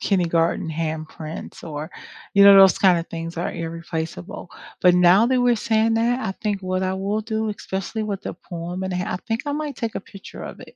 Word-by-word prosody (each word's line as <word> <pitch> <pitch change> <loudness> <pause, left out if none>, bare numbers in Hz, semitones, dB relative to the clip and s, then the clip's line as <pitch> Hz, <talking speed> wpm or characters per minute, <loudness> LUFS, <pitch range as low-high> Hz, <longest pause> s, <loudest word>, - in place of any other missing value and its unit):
kindergarten 170 -4 +1
handprints 155 0 -5
or, 155 +1 -6 0.4
you 200 0 +7
know, 200 0 +10
those 190 -2 +7
kinda 180 -3 +4
things 165 0 -6
are 170 - -2
irreplaceable, 165 - -5 0.3
but 180 -1 +5
now 180 +5 +6
that 255 0 +2
we're 245 -1 +3
saying 225 +1 +1
that, 235 +3 +1
I - - -2
think 205 0 -3
what 185 0 -1
I 185 - -1
will 200 +3 -1
do, 220 0 -2
especially 205 +1 -4
with 200 -2 -4
the - - -5
poem, 175 +2 -6
and 190 - -3
I 180 +3 -2
think 225 0 -1
I 290 - -2
might 295 -1 -3
take 230 -2 -3
a - - -3
picture 195 0 -11
of - - -8
it, - - -13
190 Hz, 200 wpm, -22 LUFS, 170-220 Hz, 0.4 s, know